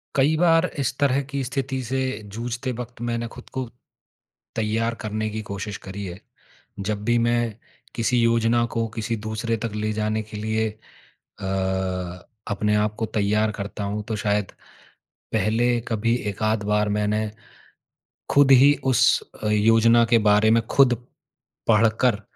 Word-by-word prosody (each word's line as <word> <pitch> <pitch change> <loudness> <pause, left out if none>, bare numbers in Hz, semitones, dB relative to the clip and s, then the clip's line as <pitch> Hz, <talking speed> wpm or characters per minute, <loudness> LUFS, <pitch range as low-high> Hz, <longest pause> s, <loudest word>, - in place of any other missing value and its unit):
कई 140 +3 +3
बार 165 0 +4
इस 130 -2 -1
तरह 140 -1 +2
की 140 -1 -2
स्थिति 135 0 -3
से 130 +3 -1 0.3
जूझते 120 +3 -3
वक़्त 120 -1 -7
मैंने 120 0 -2
ख़ुद 125 - -12
को 130 -1 -2 0.9
तैयार 115 +1 0
करने 110 0 -2
की 110 +1 -4
कोशिश 100 +1 -4
करी 100 +1 -6
है। 90 0 -7 0.7
जब 105 -1 -2
भी 120 +1 +2
मैं 120 -2 +1 0.4
किसी 120 +1 +1
योजना 115 0 +3
को 115 0 0
किसी 115 +1 -2
दूसरे 115 +1 -1
तक 115 - -2
ले 105 0 -1
जाने 110 0 -1
के 105 0 -10
लिए 110 +1 -1 0.7
अ, - - -6 1.0
अपने 105 0 0
आप 105 0 +1
को 115 - -1
तैयार 105 +1 +1
करता 100 +1 -4
हूँ, 105 +1 -3
तो 110 +1 -3
शायद 105 -2 -1 0.8
पहले 115 +3 +2
कभी 115 0 +1 0.2
एकाध 110 +1 0
बार 105 0 +1
मैंने 105 +1 0 1.0
खुद 140 -1 +6
ही 135 +3 +7
उस 130 -1 +4 0.2
अ, - - +1
योजना 115 +2 +5
के 120 - +6
बारे 105 +1 +5
में 115 +1 +4
खुद 130 -1 +4 0.7
पढ़ 115 0 +5 0.2
कर, 115 -5 +2
115 Hz, 150 wpm, -23 LUFS, 105-120 Hz, 1.0 s, ही